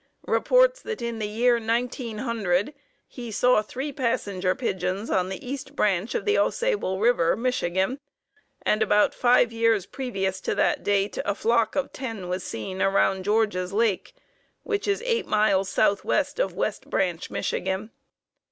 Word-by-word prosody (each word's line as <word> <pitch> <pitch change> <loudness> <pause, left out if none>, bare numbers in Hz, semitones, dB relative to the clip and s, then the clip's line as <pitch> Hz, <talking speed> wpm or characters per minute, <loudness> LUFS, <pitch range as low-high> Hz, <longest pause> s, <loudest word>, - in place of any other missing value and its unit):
reports - - +3
that 450 - -5
in 235 -1 -4
the 210 - -2
year 235 +3 +2
1900 230 -3 -1 0.3
he 240 -2 -8
saw 245 +1 +3
three 265 +7 -5
Passenger 200 -8 -1
Pigeons 190 -3 -2
on 185 -1 +1
the 190 +6 -7
East 270 +1 -6
Branch 205 -1 0
of - - -2
Au 415 - +3
Sable 420 - -1
River, 210 -7 +3
Michigan, 230 -1 0 0.6
and 215 - +1
about 210 -1 +3
five 245 -1 +3
years 225 -4 +2
previous 195 -6 -3
to - - -2
that - - +1
date 200 0 0
a 205 - -1
flock 230 0 +1
of 280 - -2
ten 225 -8 -5
was 180 0 -2
seen 185 - -5
around 195 -1 +2
George's 205 -3 +1
Lake, 225 - 0 0.5
which 415 -2 -2
is 405 +3 0
eight 465 -2 0
miles 195 -3 +2
southwest 280 - +1
of - - 0
West - - -3
Branch, 180 -3 -1
Michigan. 190 +4 -2
220 Hz, 150 wpm, -25 LUFS, 190-250 Hz, 0.6 s, reports